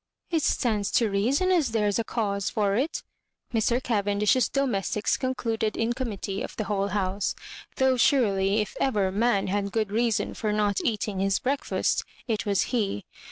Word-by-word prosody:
" - - -41
It 320 - +3
stands 215 -7 +1
to 225 -4 +3
reason 260 - +2
as 310 -10 +2
there's 210 -1 +1
a - - +1
cause 200 -4 -1
for 205 -2 0
it," 275 +8 -1 0.5
Mr. 230 +1 +2
Cavendish's 210 0 +1
domestics 215 -6 0
con 260 -1 -2
cluded 225 -3 -1
in 230 +1 +1
committee 210 -6 -4
of - - -6
the 215 - -2
whole 200 -1 -1
house; 195 0 -1 0.4
though, 265 -1 +3
surely, 210 -5 +3
if 210 - -5
ever 205 -8 +1
man 210 0 +2
had 200 +1 -1
good 215 -2 -1
reason 225 -1 0
for 215 -2 -2
not 210 -2 +1
eating 210 -3 -1
his 195 -1 +2
breakfast, 275 +2 0 0.2
it 220 -2 -1
was 200 -3 +2
he. 200 - -1
215 Hz, 170 wpm, -26 LUFS, 200-240 Hz, 0.5 s, It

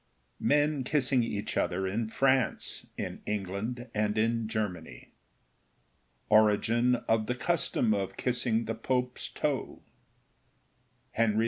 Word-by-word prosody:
MEN 145 -1 +2
KISSING 130 -2 +2
EACH 105 -3 -3
OTHER 95 +2 0
IN 110 +3 -2
FRANCE, 130 -1 +1
IN - - -5
ENGLAND, 105 +4 -3
AND 105 0 0
IN 115 0 +1
GERMANY—ORIGIN 110 - -1
OF 110 -1 +2
THE 125 - 0
CUSTOM 125 -6 +1
OF 100 -2 -2
KISSING 120 -2 0
THE 115 - -2
POPE'S 125 +2 -2
TOE— - - -3 1.3
HENRY 110 -2 +2
IV. - - +2
115 Hz, 110 wpm, -30 LUFS, 105-125 Hz, 1.3 s, MEN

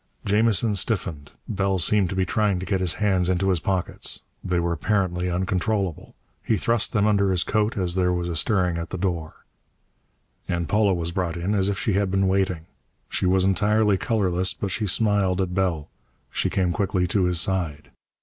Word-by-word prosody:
Jamison 105 +1 +2
stiffened. 90 -8 -2 0.2
Bell 95 -2 0
seemed 95 +1 +2
to 95 - -4
be 95 0 +1
trying 105 0 +1
to 95 - -5
get 95 0 0
his 90 -2 +1
hands 95 -4 +1
into 95 +1 +1
his 90 -3 +2
pockets. 95 +1 -2 0.2
They 90 -2 0
were 85 0 0
apparently 90 0 0
uncontrollable. 95 0 -2 0.3
He 110 - +1
thrust 115 +1 0
them 105 -1 +2
under 100 -2 +3
his 90 -2 +1
coat 110 +2 0
as 90 -3 0
there 90 -1 +1
was 90 -1 -1
a 85 - -3
stirring 90 -2 +1
at 85 - -5
the 95 - -4
door. 85 -4 -4 1.0
And 85 -1 -2
Paula 105 -2 +2
was 85 -1 -2
brought 90 -1 -2
in, 90 +4 -1
as 100 -1 +2
if 100 - -2
she 105 - -1
had 100 0 +1
been 95 0 +1
waiting. 95 -4 0 0.4
She 95 - -1
was 95 0 +3
entirely 105 +2 +3
colorless, 95 -5 0
but 100 - -4
she 105 +2 -1
smiled 100 -2 +2
at 90 -2 -1
Bell. 90 -5 -1 0.4
She - - -1
came 90 -2 0
quickly 95 -1 0
to 95 +1 +1
his 90 -2 +1
side. 85 -6 -2
95 Hz, 190 wpm, -24 LUFS, 90-100 Hz, 1.0 s, under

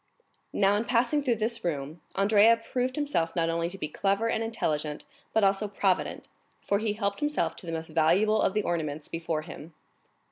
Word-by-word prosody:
22 - - -5
Now, 200 0 +4
in 220 - -1
passing 245 +5 +2
through 255 -4 +1
this 225 +2 -2
room, 155 -1 -3
Andrea 210 +3 +5 0.2
proved 255 0 0
himself 285 - -1
not 165 -1 +1
only 170 0 -1
to 195 - -8
be 150 - -3
clever 200 +7 0
and 225 -1 0
intelligent, 155 -9 -2 0.3
but 220 - +2
also 195 +2 +2
provident, 195 -2 -1 0.4
for 200 - +1
he 215 -1 0
helped 200 -1 -2
himself 295 0 0
to 180 - -8
the - - -3
most 165 0 -4
valuable 175 +8 +3
of 190 - +1
the 210 - +1
ornaments 155 -3 -2
before 165 -2 -3
him. 155 +1 -10
200 Hz, 190 wpm, -28 LUFS, 165-225 Hz, 0.4 s, Andrea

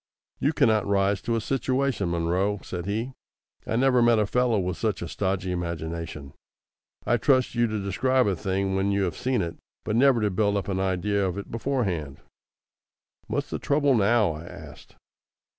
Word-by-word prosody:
"You 145 - +2
cannot 110 -9 +2
rise 100 -1 +1
to 115 - -1
a - - +1
situation, 130 -4 0
Munro," 90 +5 0
said 90 0 -5
he. 115 +6 -2 0.5
"I - - -1
never 125 0 +3
met 120 -1 +5
a 105 - +2
fellow 125 +1 +1
with 90 -1 -1
such 105 -6 -2
a - - -4
stodgy 95 0 -2
imagination. 85 -4 -5 0.7
I'd 120 -1 +1
trust 130 -3 +3
you 120 0 +2
to 110 -1 -3
describe 130 +7 +1
a 100 - +1
thing 95 +2 -1
when 95 +1 +1
you 100 0 +1
have 85 -4 -2
seen 125 -4 0
it, 85 -1 -5 0.3
but 105 - -2
never 130 0 +5
to 105 -1 +1
build 100 +2 +1
up 100 - -3
an 95 -1 -1
idea 95 +2 0
of 95 0 -2
it 100 - -7
beforehand." 100 - -2 1.1
"What's - - -3
the - - -3
trouble 145 -1 +2
now?" 110 -3 +3
I 80 +2 -8
asked. - - -12
100 Hz, 180 wpm, -26 LUFS, 95-120 Hz, 1.1 s, met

